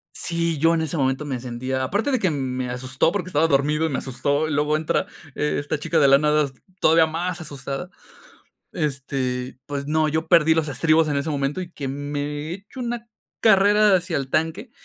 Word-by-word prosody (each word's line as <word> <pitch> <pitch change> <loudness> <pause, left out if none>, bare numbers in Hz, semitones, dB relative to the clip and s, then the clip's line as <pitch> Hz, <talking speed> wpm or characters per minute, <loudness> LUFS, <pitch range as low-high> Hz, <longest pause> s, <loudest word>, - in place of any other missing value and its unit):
Sí, 170 -2 -1
yo 165 +2 +4
en 160 - 0
ese 160 0 -3
momento 135 +2 0
me 130 -4 -3
sentía 130 +2 -3
Aparte 205 - 0
de 260 - +2
que 190 -5 +1
me 130 -3 -2
asustó 130 +5 0
porque 200 -3 -3
estaba 160 0 +3
dormido 150 +3 +2
y - - -1
me 135 - -2
asustó, 145 +4 -1
y 155 - -3
luego 150 +1 +1
entra 155 0 0 0.3
e 150 - -1
esta 145 +1 -2
chica 160 +2 0
de 140 -2 +5
la 135 - +7
nada, 150 -1 +2 0.3
todavía 160 0 +5
más 170 +2 -3
asustada. 140 +1 -6 0.8
Este, 130 -4 -3
pues, 140 -1 -4
no, 155 0 +2
yo 160 +1 -1
perdí 160 -2 +5
los 160 -2 0
estribos 155 +3 +2
en 145 - 0
ese 140 +3 -1
momento 140 +4 -1
y 175 - -9
que 140 -2 -5
me 145 +2 -4
echo 200 +7 -9
una 235 -1 -4 0.3
carrera 205 -1 +5
hacia 175 -1 -2
el 135 -1 -4
tanque. 165 - -1
150 Hz, 200 wpm, -23 LUFS, 140-165 Hz, 0.8 s, la